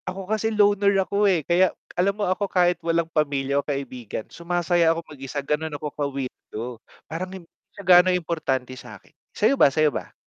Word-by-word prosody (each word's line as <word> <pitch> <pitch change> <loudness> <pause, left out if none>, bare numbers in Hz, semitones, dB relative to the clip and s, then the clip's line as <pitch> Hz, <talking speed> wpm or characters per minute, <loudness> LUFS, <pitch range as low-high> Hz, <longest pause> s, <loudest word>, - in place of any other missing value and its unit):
Ako 190 +1 -6
kasi 220 +3 0
loner 205 -2 +3
ako, 200 +1 +2
eh. 170 -6 +1
Kaya 180 +2 +4 0.2
alam 195 +3 +1
mo 210 - 0
ako, 190 +2 -1
kahit 175 -1 +2
walang 165 0 +1
pamilya 140 -2 +1
o - - -30
kaibigan, 130 -6 -5
sumasaya 170 0 +1
ako 165 0 -6
mag-isa, 140 +1 -5
gano'n 150 +1 -2
ako 150 - -5
ka-weirdo. 135 -6 -5 0.4
Parang 175 +4 -5
hindi 185 -3 -11 0.3
siya 200 - -8
gaano 180 0 +7
importante 160 -8 -1
sa'kin. 130 - -13 0.2
Sa'yo 225 +6 +3
ba, - - +8
sa'yo 150 +1 +2
ba? - - -5
170 Hz, 175 wpm, -24 LUFS, 145-185 Hz, 0.4 s, ba